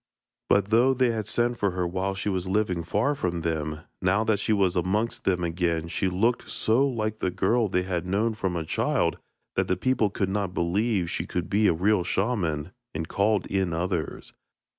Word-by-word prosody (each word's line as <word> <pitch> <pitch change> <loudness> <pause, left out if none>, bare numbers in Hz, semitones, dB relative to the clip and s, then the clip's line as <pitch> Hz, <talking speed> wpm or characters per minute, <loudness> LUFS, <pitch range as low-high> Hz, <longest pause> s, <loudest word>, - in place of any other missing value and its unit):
But 100 0 +3
though 125 +4 +4
they 125 -1 +3
had 110 -3 -3
sent 120 +2 0
for 100 - +2
her 90 -1 -2
while 95 +2 -2
she 95 - -4
was 95 -2 -1
living 95 -3 0
far 105 - +1
from 90 -11 -2
them, 80 -1 -2 0.2
now 95 +4 +2
that 110 -2 +1
she 105 - -1
was 100 -4 +2
amongst 100 +6 0
them 90 -2 +1
again 85 -1 -1
she 95 - 0
looked 115 +7 0
so 120 +6 +2
like 110 -3 -2
the - - 0
girl 100 +6 +1
they 90 -1 0
had 90 -1 -3
known 105 +5 +1
from 95 -4 -2
a 80 -2 -2
child - - 0 0.4
that - - +1
the - - +1
people 130 -5 +1
could 100 0 -1
not 95 -2 -2
believe 95 +2 +1
she - - -3
could 90 -1 -3
be 105 +1 +4
a - - +4
real 95 +3 +2
shaman, 90 -7 -1 0.2
and 80 +1 -3
called 100 0 +1
in 95 -3 -1
others. 85 -1 -3
95 Hz, 200 wpm, -26 LUFS, 90-110 Hz, 0.4 s, though